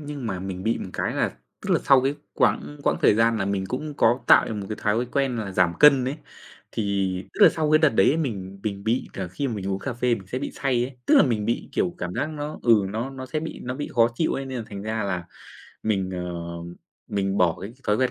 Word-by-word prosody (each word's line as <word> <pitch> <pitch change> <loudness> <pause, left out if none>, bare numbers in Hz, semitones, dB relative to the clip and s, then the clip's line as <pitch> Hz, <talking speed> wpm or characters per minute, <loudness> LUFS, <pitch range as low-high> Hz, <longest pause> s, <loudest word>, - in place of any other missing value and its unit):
nhưng 145 -4 -6
mà 95 -4 -3
mình 95 -1 -5
bị 115 +2 0
một - - -6
cái - - -2
là - - +1 0.3
tức - - -5
là - - +4
sau 135 -2 +6
cái 135 +3 0 0.2
quãng 145 0 +1
quãng - - +2
thời - - +6
gian 115 0 +3
là 95 - 0
mình 100 -1 -1
cũng 150 +3 -4
có 120 -1 +3
tạo - - +7
cho - - -3
mình 105 - -3
một 100 - -6
cái 110 - -4
thói 110 +4 +1
quen 135 -3 +1
là 105 -3 -3
giảm 90 -2 +3
cân 140 -4 +7
ấy. 135 +4 -2 0.6
Thì 100 -3 0 0.2
tức - - -7
là - - +10
sau 155 -2 -1
cái 155 - +6
đợt 155 -2 +5
đấy 105 -6 +3
ấy, 150 - +3
mình 100 - -3
mình 100 -1 -4
bị 115 +3 0
cờ 95 -2 -4
khi 135 +10 -3
mà 115 - -3
mình 100 -2 -4
uống 95 - -1
cà 135 - -4
phê 120 +1 +1
mình 95 -5 -9
sẽ 125 +7 -3
bị - - -4
say 125 -3 0
ấy, 130 0 -8
tức - - +5
là - - +8
mình 110 -5 0
bị, 115 +2 -2
kiểu, 90 - 0
cảm 90 0 -4
giác 155 - -1
nó 150 0 -5
ừ, 115 -4 +5
nó 115 +6 -3
nó 130 -1 -7
sẽ 155 +4 -2
bị 160 - -6
nó 125 +1 -4
bị 145 - -4
khó 115 -2 +5
chịu 160 +6 0
ấy, 135 - -3
nên 130 -1 -4
là 115 - -5
thành 100 -1 -7
ra 110 +1 -2
là 90 -3 -2 0.6
mình, 95 -4 0
ờ, 90 -1 -4 0.7
mình 95 -1 -1
bỏ 85 -2 +3
cái 100 +4 -7
thói 105 -1 +2
quen 130 +2 +1
115 Hz, 275 wpm, -24 LUFS, 100-135 Hz, 0.7 s, là